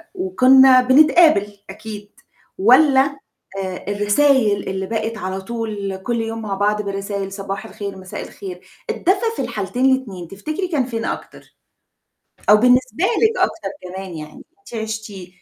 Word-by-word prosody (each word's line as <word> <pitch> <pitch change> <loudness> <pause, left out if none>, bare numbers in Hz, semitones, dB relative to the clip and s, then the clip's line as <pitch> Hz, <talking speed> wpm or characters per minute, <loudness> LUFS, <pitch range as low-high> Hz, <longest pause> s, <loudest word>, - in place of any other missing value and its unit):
وكنّا 265 -8 +6
بنتقابل 260 - +4
أكيد 210 0 -9 0.5
والّا 270 +5 +4 0.4
آآ 185 -1 -5
الرسايل 205 +1 +2
اللي 190 0 -3
بقت 225 0 -3
على 190 -1 -4
طول 210 -2 -4
كلّ 230 +4 -2
يوم 225 0 -4
مع 210 -3 -4
بعض 210 +2 0
بالرسايل: 200 -1 -4
"صباح 195 0 -5
الخير، 200 -2 -7
مساء 185 -1 -8
الخير". 180 -2 -9 0.3
الدفا 400 +5 0
في - - -3
الحالتين 210 +6 -2
الاتنين 195 -10 -8
تفتكري 305 - -4
كان 290 -8 0
فين 230 -2 -4
أكتر؟ - - -7 1.0
أو 210 - +9
بالنسبة 250 - +2
لِك 450 +2 +2
أكتر 215 -2 -1
كمان 185 0 -7
يعني 155 -1 -10 0.2
أنتِ 320 - -14
عِشتِيه 220 -4 -6
215 Hz, 135 wpm, -20 LUFS, 195-260 Hz, 1.0 s, أو